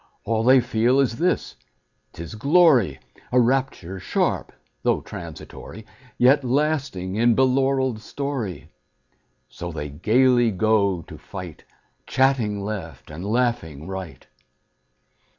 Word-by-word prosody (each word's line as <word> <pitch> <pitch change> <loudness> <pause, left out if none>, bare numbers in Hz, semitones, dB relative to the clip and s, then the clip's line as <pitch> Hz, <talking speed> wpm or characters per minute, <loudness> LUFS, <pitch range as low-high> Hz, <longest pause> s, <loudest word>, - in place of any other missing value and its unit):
All 115 -1 0
they 130 +2 +6
feel 120 +4 +2
is 125 -4 +1
this: 180 +1 0 0.6
't 85 - -8
is 85 - -9
glory, 135 - +4 0.3
A 125 - +4
rapture 120 -7 0
sharp, - - -1 0.3
though - - +1
transitory, 110 +1 -10 0.3
Yet 135 +3 +4
lasting 130 -9 -1
in 120 0 +4
belaureled 130 -2 +2
story. 110 - -5 0.8
So 85 0 -7
they 75 -2 -5
gayly 120 - +3
go 100 -3 +1
to - - -12
fight, 90 -4 -9 0.4
Chatting 120 -7 +1
left 90 -10 -6
and 80 +4 -7
laughing 110 - -1
right. 95 -3 -7
115 Hz, 115 wpm, -23 LUFS, 95-130 Hz, 0.8 s, they